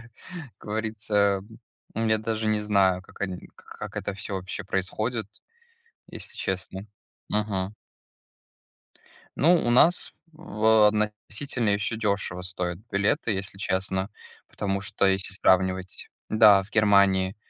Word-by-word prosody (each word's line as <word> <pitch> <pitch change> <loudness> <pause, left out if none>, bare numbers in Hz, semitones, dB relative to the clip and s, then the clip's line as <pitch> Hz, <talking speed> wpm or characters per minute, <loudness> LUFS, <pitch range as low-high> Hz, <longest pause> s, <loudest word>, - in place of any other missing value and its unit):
как 115 +1 -16 0.5
говорится, 105 -2 0 0.5
я 110 0 +1
даже 110 0 -2
не 110 0 +1
знаю, 100 -3 +2
как - - -18
они 95 -2 -4
к - - -22
как - - -7
это - - -3
всё 100 +1 -5
вообще 95 +2 -5
происходит, 110 +4 -2 0.8
если - - -10
честно. 95 +1 -4 0.4
Мгм. 105 -2 -2 1.6
Ну, 170 +5 +5
у - - +2
нас 160 +9 +4 0.2
в 110 -6 +3
относительно 105 +3 -2
ещё 100 +2 0
дешево 100 -4 -1
стоят 90 -1 -3
билеты, 105 +5 +1
если 95 0 -5
честно, 95 0 -1 0.4
потому 100 -1 -2
что, 100 0 0
если 95 +1 +1
сравнивать. 95 -1 +1 0.2
Да, 105 -3 +6
в 95 - -15
Германии 100 -2 +3
100 Hz, 120 wpm, -26 LUFS, 95-110 Hz, 1.6 s, Да